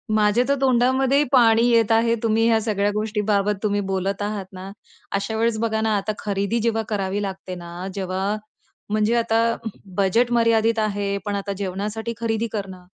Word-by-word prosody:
माझ्या 210 +3 +3
तर 280 - +4
तोंडामध्येही 260 +2 +3
पाणी 230 -4 +5
येत 230 -2 +3
आहे 230 +1 +3
तुम्ही 225 0 +2
ह्या 225 -1 +4
सगळ्या 205 -2 0
गोष्टींबाबत 210 -1 0
तुम्ही 205 -1 +1
बोलत 195 +1 -1
आहात 205 -1 -3
ना. 190 +1 -8 0.4
अशा 200 +3 -2
वेळेस 230 0 +1
बघा 220 -1 0
ना, 220 -1 +1
आता 200 +2 -2
खरेदी 200 +3 -1
जेव्हा 225 0 0
करावी 200 -1 -1
लागते 190 -2 -5
ना, 175 +1 -7
जेव्हा 190 +1 -2 0.6
म्हणजे 215 +2 +2
आता 230 -1 +2 0.5
बजेट 225 +5 +2
मर्यादित 230 -1 +3
आहे 205 -2 -1
पण 205 - -2
आता 200 0 -3
जेवणासाठी 205 +4 -3
खरेदी 225 0 0
करणं. 190 -4 -6
215 Hz, 160 wpm, -22 LUFS, 200-230 Hz, 0.6 s, पाणी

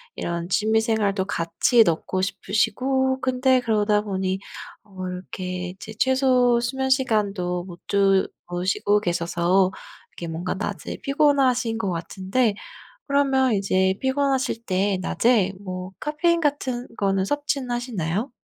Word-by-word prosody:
이런 170 +1 -4
취미 220 +3 +2
생활도 210 -4 +1
같이 180 +7 +3
넣고 170 +3 -1
싶으시고 260 +7 0
근데 255 0 +2
그러다 210 -2 +2
보니 190 -2 -2 0.4
어 190 -3 -7
이렇게 180 0 -5
이제 195 +4 -9
최소 255 -1 +3
수면 265 +2 -2
시간도 205 -9 0
못 175 -1 -11
주무시고 195 0 +1
계셔서 175 +1 +1 0.5
이게 170 - -5
뭔가 170 +4 -3
낮에 205 -1 -5
피곤하신 275 -5 +2
것 220 -4 -2
같은데 190 +6 -1 0.5
그러면 270 -4 +3
이제 190 -1 +2
피곤하실 265 -3 0
때 190 0 +1
낮에 205 0 +2
뭐 185 -1 -6
카페인 340 +3 +1
같은 265 -5 -1
거는 195 -1 +1
섭취는 285 0 -2
하시나요? 235 - -2
210 Hz, 275 characters per minute, -23 LUFS, 185-255 Hz, 0.5 s, 같이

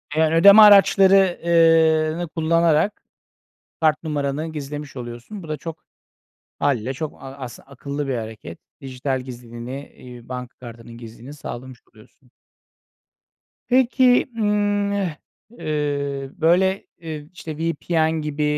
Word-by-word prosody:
Eee, 160 - +2
yani 160 0 +2
ödeme 200 +5 +8
araçları 195 -2 +6
eee, 165 -1 +4
nı 175 - -3
kullanarak 165 +3 +1 0.8
kart 155 -1 +2
numaranı 150 -1 -2
gizlemiş 145 -1 -7
oluyorsun. 120 - -8
Bu 160 - -11
da 155 - -3
çok 160 -1 -9 0.8
hâliyle 130 -3 0
çok 155 +2 -7
a 135 - -8
aslı 130 -3 -9
akıllı 140 +1 -6
bir 135 - -1
hareket. 110 -7 -8 0.2
Dijital 130 0 -3
gizliliğini, 125 +2 -9
iii, 125 -1 -13
banka 125 -1 -7
kartının 115 -1 -11
gizliliğini 120 +3 -11
sağlamış 130 -3 -9
oluyorsun. 115 +3 -22 1.4
Peki, 250 0 +4
ımm, 205 -1 +1
e 185 -7 -2 0.4
eee, 140 -2 -2
böyle, 190 +4 +1
eee, 160 -3 -6
v 150 - -22
işte, 165 -5 -8
VPN 160 0 0
gibi, 150 0 -3
150 Hz, 125 wpm, -21 LUFS, 130-170 Hz, 1.4 s, ödeme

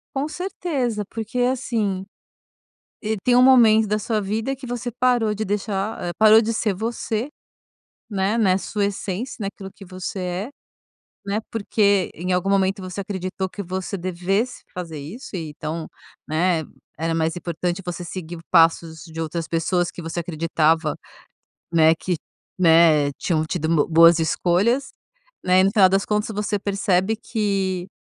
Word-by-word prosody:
Com 275 +2 0
certeza. 310 - -2
Porque, 225 +2 -4
assim, 230 -6 0 1.0
e 220 0 -1
tem 245 - +4
um 250 - +6
momento 225 -4 +6
da 210 +1 0
sua 215 0 -1
vida 220 +7 -2
que 265 0 -10
você 245 0 -4
parou 240 -3 +2
de 215 - -2
deixar 205 +1 -2
ah - - -2
parou 220 +1 +7
de 230 +1 -1
ser 215 -2 0
você, 225 +4 -3 0.8
né? 200 +2 0
Na 190 -4 +3
sua 200 +2 -2
essência, 205 +5 -4
naquilo 195 -1 -6
que 195 - -13
você 185 +1 -6
é, 180 +5 -3 0.8
né? 200 +2 -1
Porque 200 -3 +1
em 180 +3 -3
algum 180 +2 +1
momento 195 0 +2
você 185 +2 -5
acreditou 190 -1 -4
que 200 - -6
você 190 +2 -4
devesse 185 +6 -2
fazer 165 -4 -6
isso 190 - -9
e 160 -3 -5
então, 155 +2 -5 0.4
né, 165 +1 +1 0.3
era 165 +1 -1
mais 165 0 0
importante 175 +1 -3
você 175 -1 -5
seguir 175 -1 -7
passos 165 -1 +3
de 165 -1 -7
outras 165 +1 -3
pessoas 170 +2 0
que 175 - -9
você 165 +1 -3
acreditava, 160 -1 +1 0.8
né, 160 0 +5
que, 180 +2 -2 0.4
né, 160 -4 +5
tinham 160 -3 0
tido 160 -1 -2
bo 160 -1 +2
boas 165 +1 +7
escolhas, 200 +11 +1 0.5
né? 185 0 +5
E - - +5
no 195 - +3
final 195 -4 +6
das 195 +1 +1
contas 210 +1 -1
você 210 0 -1
percebe 195 +1 0
que 195 -5 -2
190 Hz, 155 wpm, -22 LUFS, 170-220 Hz, 1.0 s, parou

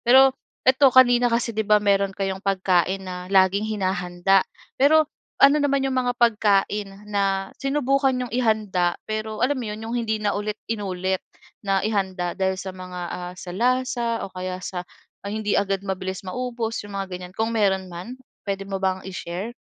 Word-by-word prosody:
Pero, 265 +2 +6 0.3
eto 265 +2 +6
kanina 245 -1 +6
kasi 230 0 0
'di 220 - -1
ba 210 - +7
meron 200 -1 +1
kayong 195 -1 -2
pagkain 190 -1 +1
na 180 -1 -6
laging 195 +2 +3
hinahanda. 190 -2 +1 0.4
Pero 310 +3 +6 0.3
ano 280 +2 +6
naman 275 -1 +1
'yong 270 - 0
mga 250 -1 +1
pagkain 210 -3 +2 0.2
na 195 -2 -1
sinubukan 275 -1 +1
nyong 250 -1 -4
ihanda 215 -7 +1
pero 215 +1 -2
alam 260 0 0
mo 230 - -4
'yon 215 +1 -6
'yong 230 - -5
hindi 220 -1 -1
na 210 -1 0
ulit 210 +1 -3 0.2
inulit 190 -3 -2 0.4
na 195 -1 0
ihanda 190 -4 -1
dahil 190 -1 0
sa 190 0 -6
mga, 185 -1 -8
ah, 180 0 -6
sa 180 -1 -8
lasa 245 +3 +1 0.2
o 195 - -9
kaya 185 0 -4
sa 180 -1 -5 0.3
hindi 210 +1 -3
agad 195 -1 0
mabilis 190 0 -4
maubos 235 +2 -3
'yong 205 -1 -8
mga 195 0 -2
ganyan? 180 0 -7
Kung 225 +1 0
meron 190 -4 +1
man 185 +9 -7 0.3
puwede 195 0 -2
mo 195 -1 -4
bang 190 0 -1
i-share? 185 +3 -5
200 Hz, 170 wpm, -24 LUFS, 190-235 Hz, 0.4 s, ba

